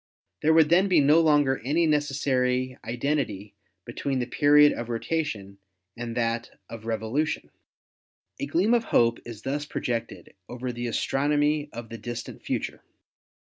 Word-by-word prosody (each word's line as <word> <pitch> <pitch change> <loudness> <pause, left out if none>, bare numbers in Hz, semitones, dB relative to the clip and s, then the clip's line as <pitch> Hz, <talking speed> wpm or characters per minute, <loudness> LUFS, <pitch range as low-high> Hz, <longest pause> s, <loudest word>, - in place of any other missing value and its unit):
There 155 - +3
would 160 -2 +5
then 180 +4 +4
be 180 -4 +4
no 150 +3 +5
longer 145 -4 +3
any 155 +6 +2
necessary 130 -4 0
identity 115 -4 -2 0.3
between 135 +3 -3
the 125 - -1
period 145 +2 +5
of 120 0 -6
rotation 115 -6 -3 0.4
and 120 0 -5
that 115 0 -1 0.2
of 115 -1 -9
revolu 115 +7 -1
tion. - - -5 0.9
A 140 - -3
gleam 180 +10 +2
of 235 -1 +2
hope 115 0 +3
is 115 -3 -9
thus 145 +2 -3
projected 115 -4 -4 0.2
over 125 +1 -4
the 120 0 -4
astron 135 +5 0
omy 150 0 +1
of 115 -1 -8
the 115 - -8
distant 120 +2 -7
future. - - -3
130 Hz, 150 wpm, -26 LUFS, 115-150 Hz, 0.9 s, would